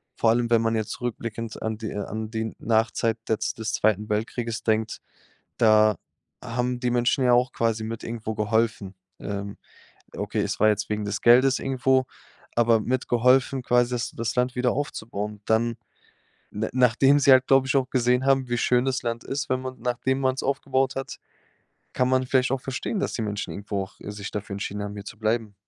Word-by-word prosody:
Vor 115 - +2
allem, 120 +1 +2
wenn 115 -1 +5
man 115 0 +1
jetzt 110 +1 -3
rückblickend 115 -1 -5
an 110 -1 -2
die 110 -1 -5
äh, - - -5
an 110 +1 -5
den 110 -1 -3
Nachzeit 115 0 +1
jetzt 110 0 -1
des 110 -1 -3
Zweiten 105 0 +1
Weltkrieges 110 +2 -2
denkt, 110 0 0 0.6
da 110 -1 +5 0.5
haben 125 +1 -2
die 125 -1 0
Menschen 125 +2 +2
ja 125 - +4
auch 125 +1 +3
quasi 115 -1 0
mit 115 0 -6
irgendwo 110 -1 -4
geholfen. 105 -2 0 0.3
Ähm. 100 0 -5 0.6
Okay, - - -2
es - - -2
war 110 - +5
jetzt 105 -1 -1
wegen 105 -1 -2
des 100 +1 -3
Geldes 130 +3 +5
irgendwo, 130 0 +1 0.5
aber 115 -2 +4
mitgeholfen 125 +2 +2
quasi 120 0 +2
das 120 - -2
das 115 0 -3
Land 125 0 +1
wieder 125 0 +1
aufzubauen. 105 -7 -4
Dann, 115 +1 +1 0.7
na 110 +2 -3
nachdem 130 +3 +4
sie 140 - +5
halt, 130 0 +6
glaube 135 -1 +4
ich, 140 - +2
auch 130 -2 +1
gesehen 125 +1 +2
haben, 135 -2 +3
wie 120 0 -1
schön 125 +1 +2
das 135 -1 -1
Land 115 -1 -3
ist, 135 0 -3
wenn 130 0 +1
man 130 0 -6
nachdem 125 +2 -1
man's 130 0 0
aufgebaut 135 -1 0
hat, 135 - -5 0.8
kann 125 0 +2
man 130 0 +2
vielleicht 130 0 +2
auch 135 - 0
verstehen, 135 - -3
dass - - -2
die 115 - -2
Menschen 105 -1 -3
irgendwo 100 -1 -3
auch, 95 - -18
äh, 105 - -7
sich 105 -1 -7
dafür 105 -1 -5
entschieden 100 +1 -4
haben, 100 - -5
hier 100 - -8
zu 105 - -9
bleiben. 110 -1 -1
115 Hz, 195 wpm, -25 LUFS, 110-130 Hz, 0.8 s, halt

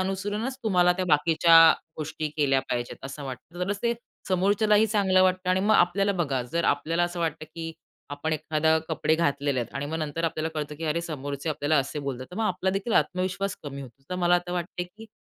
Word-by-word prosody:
अनुसरूनच 205 +7 -2
तुम्हाला, 180 -4 +4
त्या 185 +1 -2
बाकीच्या 165 +2 +4 0.4
गोष्टी 155 0 -4
केल्या 135 -3 +3
पाहिजेत 120 +2 -4
असं 140 +1 -7
वाटतं. 140 +6 -8
तरच 200 +1 -2
ते 235 0 +2 0.4
समोरच्यालाही 205 +3 +3
चांगलं 195 -3 +3
वाटतं 185 0 +2
आणि 185 +1 +2
मग 210 +3 +3
आपल्याला 195 +3 +3
बघा. 135 -5 -1
जर 165 +8 -2
आपल्याला 165 +4 +1
असं 175 0 -4
वाटतं 160 -1 -2
की 165 -1 -5 0.4
आपण 145 +3 -3
एखादे 155 +1 +1
कपडे 160 -1 +1
घातलेले 145 -4 0
आहेत 120 - -6
आणि 140 +1 -3
मग 160 +2 -3
नंतर 155 +2 -3
आपल्याला 160 -1 -1
कळतं 150 -1 -4
की 165 - -6
अरे, 155 +2 0
समोरचे 145 -2 -5
आपल्याला 150 +1 +1
असे 135 +2 -2
बोलतात. 130 -2 -5
तर 180 - -9
मग 225 - 0
आपला 190 -2 0
देखील 195 +4 -2
आत्मविश्वास 185 +1 0
कमी 140 -1 -7
होतो. 130 0 -14
तर - - -1
मला 175 0 +5
आता 175 0 -1
वाटतं 175 0 -4
आहे, - - -4
की 225 +1 -11
165 Hz, 205 wpm, -26 LUFS, 145-185 Hz, 0.4 s, मला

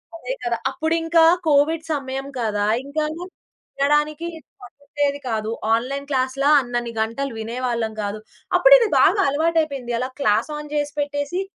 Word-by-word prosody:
అదే 260 -6 -5
కదా! 240 -1 -1
అప్పుడింకా 325 +3 +2 0.2
కోవిడ్ 305 +2 +3
సమయం 270 -1 -4
కదా, 210 -3 0 0.2
ఇంకా 300 +2 -2 0.7
వినడానికి 295 +3 +1 0.3
పట్టుండేది 285 +2 -3
కాదు. 220 -1 -2 0.3
ఆన్లైన్ 275 +4 -3
క్లాస్‌లా 265 +2 +1
‌అన్నిన్ని 240 -1 -3
గంటలు 230 +4 -3
వినేవాళ్ళం 230 0 -2
గాదు. 205 +1 -4 0.4
అప్పుడి - - +8
ఇది 460 - +2
బాగా 400 - +4
అలవాటైపోయింది. 290 -4 0
అలా 255 - -2
క్లాస్‌ఆన్ 290 +6 0
జేసిపెట్టేసి 290 +3 -2
280 Hz, 120 wpm, -22 LUFS, 240-300 Hz, 0.7 s, అప్పుడి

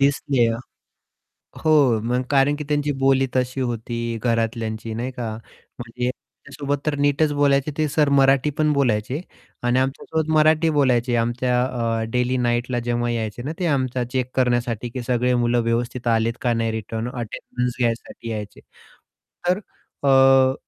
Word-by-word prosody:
दिसले. 140 -3 +2 1.2
हो, 125 -5 +3
कारण 140 +1 +3
की 150 - -5
त्यांची 145 0 0
बोली 135 0 +3
तशी 130 +1 0
होती 120 -1 -3 0.3
घरातल्यांची 115 -1 -1
नाही 120 +3 -3
का. 120 -3 -4 0.5
म्हणजे 120 +1 -4
माझ्यासोबत 140 +2 -5
तर 150 -1 0
नीटच 145 +1 +2
बोलायचे, 140 0 +2
ते 155 -1 +1
सर 150 0 +2
मराठी 135 +1 +4
पण 155 -1 +3
बोलायचे. 130 +2 0 0.4
आणि 120 +1 +2
आमच्यासोबत 150 +4 -2
मराठी 155 +1 +4
बोलायचे 125 -3 +2
आमच्या 125 +1 +1
अ, 115 -3 -1
डेली 125 +1 +1
नाईटला 120 0 0
जेव्हा 120 0 0
यायचे 115 0 -3
ना, 150 - -3
ते 180 - 0
आमचा 130 -4 0
चेक 130 -1 -1
करण्यासाठी 120 -2 0
की 125 +1 -5
सगळे 125 +1 +1
मुलं 120 0 +2
व्यवस्थित 120 +1 -2
आलेत 115 0 +2
का 120 -2 +1
नाही 115 -1 0
रिटर्न? 110 +2 -4
अटेंडन्स 125 +1 -4
घ्यायसाठी 115 -1 -2
यायचे. 105 -2 -6 0.9
तर 185 +3 +2 0.4
अ, 135 -1 +5
125 Hz, 140 wpm, -22 LUFS, 120-140 Hz, 1.2 s, अ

